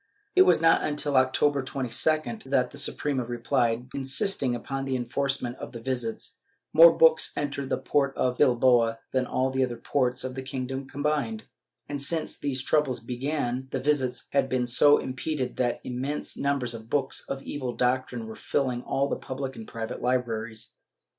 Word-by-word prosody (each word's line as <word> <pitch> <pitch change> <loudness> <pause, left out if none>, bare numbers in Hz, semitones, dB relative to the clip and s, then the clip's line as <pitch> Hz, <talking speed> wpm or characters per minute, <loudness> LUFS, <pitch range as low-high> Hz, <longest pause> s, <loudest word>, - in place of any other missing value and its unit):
It 375 0 +7
was - - +5
not 165 - +5
until 145 -1 -1
October 135 +2 +3
22d 155 - -1
that 135 -2 +1
the - - -6
Suprema 140 -4 -1
replied, 120 0 0
insisting 135 0 0
upon 135 +3 -4
the 135 -1 -1
enforcement 130 0 -1
of - - -8
the 120 - -6
visits; 120 -2 -3 0.3
more 165 +1 +10
books 160 -1 +5
entered 140 -2 -3
the - - +1
port 140 -2 0
of 125 -1 0
Bilbao 120 -3 +4
than 130 -1 0
all 130 +1 0
the 130 0 +1
other 120 -2 -2
ports 125 -2 0
of 130 0 -4
the 130 - -5
kingdom 130 0 -4
combined, 150 +10 -1 0.4
and 145 -1 -4
since 160 +3 -1
these 130 -2 -2
troubles 150 -4 +1
began 125 +1 -3
the 135 - -2
visits 130 -2 0
had 140 -1 +2
been 125 -1 +1
so 145 +4 +5
impeded 130 0 -3
that 120 -2 0
immense 130 +4 -3
numbers 140 -4 -1
of 115 0 -9
books 135 -1 0
of 135 0 -4
evil 130 -4 -4
doctrine 125 -1 0
were 110 - -7
filling 130 -4 -1
all 135 +2 0
the - - -1
public 135 0 -5
and 110 - -9
private 115 -1 -5
libraries. 115 -2 -2
130 Hz, 170 wpm, -27 LUFS, 125-140 Hz, 0.4 s, more